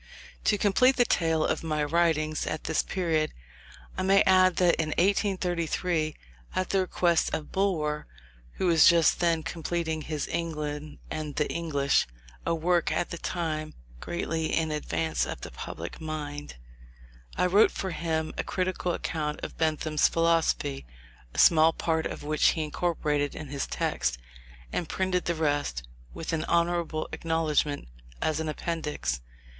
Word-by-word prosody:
To 210 Hz, -, +4 dB
complete 250 Hz, +7 st, +4 dB
the 245 Hz, -, +4 dB
tale 165 Hz, -6 st, +2 dB
of -, -, 0 dB
my 155 Hz, -2 st, 0 dB
writings 155 Hz, -1 st, +1 dB
at 155 Hz, -, -3 dB
this 160 Hz, -, +1 dB
period, 160 Hz, -4 st, -1 dB, 0.6 s
I -, -, -2 dB
may 195 Hz, +1 st, +5 dB
add 185 Hz, -1 st, +5 dB
that 175 Hz, 0 st, +4 dB
in 155 Hz, -, -2 dB
1833, 175 Hz, -4 st, +1 dB, 0.4 s
at 185 Hz, -1 st, -1 dB
the 195 Hz, -, +3 dB
request 175 Hz, -2 st, +2 dB
of 155 Hz, -2 st, -6 dB
Bulwer, 155 Hz, -6 st, 0 dB, 0.5 s
who -, -, -2 dB
was 165 Hz, -3 st, +6 dB
just 170 Hz, -2 st, +5 dB
then 170 Hz, -2 st, +2 dB
completing 165 Hz, -1 st, -2 dB
his 150 Hz, -1 st, -3 dB
England 150 Hz, -2 st, -3 dB
and 155 Hz, -2 st, -4 dB
the 150 Hz, -, +1 dB
English 145 Hz, -5 st, +1 dB, 0.4 s
(a 165 Hz, -, +2 dB
work, 170 Hz, +1 st, +1 dB
at 175 Hz, -, -1 dB
that 170 Hz, -, -6 dB
time, 155 Hz, -3 st, -3 dB, 0.2 s
greatly 165 Hz, -, -2 dB
in 160 Hz, -1 st, 0 dB
advance 80 Hz, -, -1 dB
of -, -, -6 dB
the -, -, -7 dB
public 85 Hz, -, -7 dB
mind), 150 Hz, -, -5 dB, 0.8 s
I -, -, +3 dB
wrote 200 Hz, +4 st, +5 dB
for 190 Hz, -, -4 dB
him 160 Hz, -2 st, -2 dB
a -, -, +1 dB
critical 185 Hz, -1 st, -1 dB
account 150 Hz, -2 st, -3 dB
of -, -, -5 dB
Bentham's 155 Hz, -1 st, +2 dB
philosophy, 165 Hz, -, +1 dB, 0.4 s
a -, -, -12 dB
small 160 Hz, 0 st, +6 dB
part 160 Hz, -1 st, 0 dB
of -, -, -7 dB
which 155 Hz, +1 st, +2 dB
he 160 Hz, -, +2 dB
incorporated 150 Hz, -2 st, -1 dB
in 155 Hz, -, -7 dB
his 140 Hz, -1 st, -3 dB
text, -, -, -1 dB, 0.6 s
and 170 Hz, -, -2 dB
printed 185 Hz, -1 st, 0 dB
the 170 Hz, -, 0 dB
rest 145 Hz, -, -1 dB, 0.2 s
(with 165 Hz, -, -5 dB
an 160 Hz, -, 0 dB
honourable 170 Hz, -2 st, 0 dB
acknowledgment), 155 Hz, -, 0 dB, 0.3 s
as 155 Hz, -1 st, 0 dB
an 160 Hz, -1 st, -2 dB
appendix. 150 Hz, -, -3 dB
160 Hz, 150 wpm, -28 LUFS, 150-175 Hz, 0.8 s, was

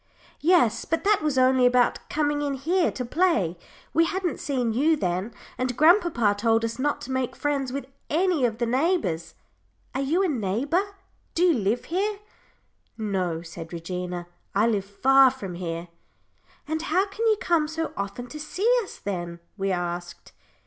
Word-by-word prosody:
"Yes, 270 Hz, -10 st, +3 dB
but 330 Hz, -, -1 dB
that 410 Hz, -2 st, +3 dB
was 300 Hz, -3 st, 0 dB
only 255 Hz, 0 st, +4 dB
about 245 Hz, -1 st, +3 dB
coming 295 Hz, -1 st, 0 dB
in 285 Hz, -1 st, -1 dB
here 335 Hz, +6 st, +1 dB
to 250 Hz, -, -4 dB
play. 235 Hz, -, +1 dB, 0.4 s
We 330 Hz, +1 st, +4 dB
hadn't 365 Hz, -1 st, -2 dB
seen 250 Hz, -5 st, -1 dB
you 300 Hz, +7 st, +3 dB
then 185 Hz, -, -2 dB, 0.3 s
and 255 Hz, -1 st, -1 dB
grandpapa 315 Hz, -, +4 dB
told 225 Hz, +1 st, +2 dB
us 230 Hz, +2 st, -4 dB
not 290 Hz, +2 st, 0 dB
to 260 Hz, -, -7 dB
make 260 Hz, -1 st, -1 dB
friends 280 Hz, -3 st, -1 dB
with 275 Hz, +1 st, -4 dB, 0.2 s
any 340 Hz, -2 st, +2 dB
of 225 Hz, -3 st, +1 dB
the 240 Hz, -, 0 dB
neighbours. 250 Hz, -, 0 dB, 0.6 s
Are 265 Hz, -, -1 dB
you 320 Hz, +8 st, +1 dB
a -, -, +2 dB
neighbour? 260 Hz, -, 0 dB, 0.5 s
Do 340 Hz, -, +2 dB
you 355 Hz, -2 st, +5 dB
live 225 Hz, -1 st, 0 dB
here?" 400 Hz, +5 st, -1 dB, 0.8 s
"No," 185 Hz, -6 st, -2 dB
said 165 Hz, 0 st, -9 dB
Regina. 180 Hz, +1 st, -4 dB, 0.3 s
"I 205 Hz, +3 st, +4 dB
live 210 Hz, -4 st, +1 dB
far 265 Hz, +6 st, +5 dB
from 205 Hz, -8 st, -7 dB
here." 170 Hz, -1 st, -5 dB, 0.8 s
"And 315 Hz, +1 st, -2 dB
how 350 Hz, +4 st, +1 dB
can 420 Hz, +3 st, -2 dB
you 435 Hz, -1 st, +4 dB
come 340 Hz, -9 st, +2 dB
so 320 Hz, +1 st, -3 dB
often 200 Hz, +5 st, -4 dB
to 305 Hz, -, -8 dB
see 365 Hz, +8 st, -2 dB, 0.2 s
us, 390 Hz, -, -10 dB
then?" 175 Hz, -3 st, -5 dB, 0.2 s
we 195 Hz, -1 st, -1 dB
asked. 175 Hz, -1 st, -4 dB
255 Hz, 170 wpm, -25 LUFS, 200-320 Hz, 0.8 s, you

